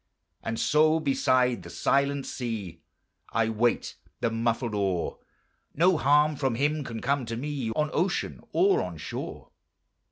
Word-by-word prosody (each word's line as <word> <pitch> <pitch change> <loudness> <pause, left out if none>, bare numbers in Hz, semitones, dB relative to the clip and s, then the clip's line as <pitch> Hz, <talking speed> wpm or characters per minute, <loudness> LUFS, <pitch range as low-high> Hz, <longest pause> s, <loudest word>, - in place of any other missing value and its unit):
And 115 0 -3
so 155 +1 +4
beside 130 -4 +2
the - - -10
Silent 140 0 +1
Sea 110 -8 -5 0.5
I 115 -1 +1
wait 115 +2 0 0.2
the 115 - 0
muffled 115 0 -1
oar; 95 -4 -1 0.6
No 180 +4 +4
harm 150 +1 +4
from 130 -4 0
Him 145 +4 0
can 115 -4 -6
come 140 +1 +1
to 115 0 -3
me 140 -2 -3
On 150 0 0
ocean 175 +3 -1
or 390 +3 +3
on - - -5
shore. - - -7
135 Hz, 140 wpm, -27 LUFS, 115-150 Hz, 0.6 s, so